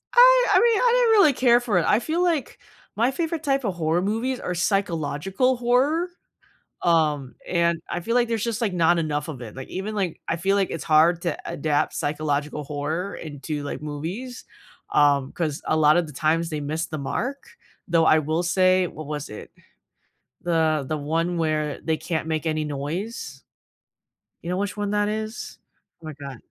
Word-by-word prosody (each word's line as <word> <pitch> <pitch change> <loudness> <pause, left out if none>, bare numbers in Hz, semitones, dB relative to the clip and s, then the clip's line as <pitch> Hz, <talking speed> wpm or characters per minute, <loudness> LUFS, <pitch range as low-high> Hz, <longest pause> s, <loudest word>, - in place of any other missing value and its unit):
I - - +7
I - - +7
mean, 465 -3 +4
I 485 -1 +4
didn't - - +4
really 300 -5 +5
care 245 -2 +4
for 225 -6 0
it, 165 - +2
I 210 - +4
feel 330 +6 -1
like 330 -6 -1 0.4
my 235 +4 +2
favorite 325 +2 -3
type 275 -2 +1
of 195 -4 -2
horror 165 +1 +1
movies 225 +6 -1
are 180 - -3
psychological 190 - 0
horror, 265 +8 +2 0.8
um, 150 -6 +1
and 170 -1 +2
I 175 - -3
feel 230 +7 -2
like 240 -1 +3
there's 225 -3 -1
just, 230 -1 -2
like, 220 -5 0
not 170 -1 +3
enough 150 -2 -2
of 140 -6 -6
it, 115 -2 -9
like, 130 - -7
even 200 +3 -4
like 190 -5 -2
I 170 - 0
feel 195 +4 +1
like 195 -2 +1
it's 165 - -5
hard 165 +2 +4
to 170 -4 -1
adapt 145 0 0
psychological 145 0 -2
horror 155 +7 -3
into, 150 -1 -5
like, 145 - -5
movies, 175 - -6 0.5
um, 140 -2 +3
'cause 155 -4 -3
a 155 - +1
lot 155 0 +5
of 175 -2 +2
the 150 - -10
times 165 +3 +1
they 155 -1 -3
missed 155 +3 -3
the 155 - -4
mark, 250 - -4 0.4
though 165 -1 +3
I 155 - +5
will 155 +3 0
say 185 +1 +3
What 155 -3 -8
was 150 -1 -5
it? 105 - -9 0.9
The 160 -4 +1
The 155 +1 -1
one 165 +4 -1
where 155 -2 -1
they 160 -1 0
can't 160 -2 -3
make 160 0 -2
any 155 -1 0
noise. 145 +1 -5 1.0
You 170 - -5
know 180 - -1
which 205 +1 -3
one 205 0 -2
that 205 0 +1
is? 215 +1 -5 0.4
Oh - - -12
my 155 - -6
god. 140 -3 -7
170 Hz, 190 wpm, -24 LUFS, 155-215 Hz, 1.0 s, I